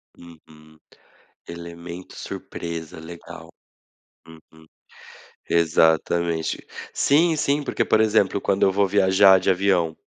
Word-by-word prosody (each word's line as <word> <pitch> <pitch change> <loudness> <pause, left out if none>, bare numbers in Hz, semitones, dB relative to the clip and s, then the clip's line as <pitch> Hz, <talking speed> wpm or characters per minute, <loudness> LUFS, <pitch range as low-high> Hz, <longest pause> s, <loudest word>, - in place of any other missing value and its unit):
Uhum. 80 -2 -18 0.7
"Elemento 85 +1 -9
surpresa", 85 -2 -7
legal. 85 +1 -11 0.8
Uhum. 80 0 -18 0.8
Exatamente. 80 0 +1 0.3
Sim, 160 +3 +2
sim, 145 0 0
porque, - - -1
por 110 - +2
exemplo, 105 -3 +2
quando 100 0 -1
eu 95 - +3
vou 100 +1 +2
viajar 95 0 +5
de 90 - +1
avião, 90 -4 +1
85 Hz, 100 wpm, -22 LUFS, 80-100 Hz, 0.8 s, viajar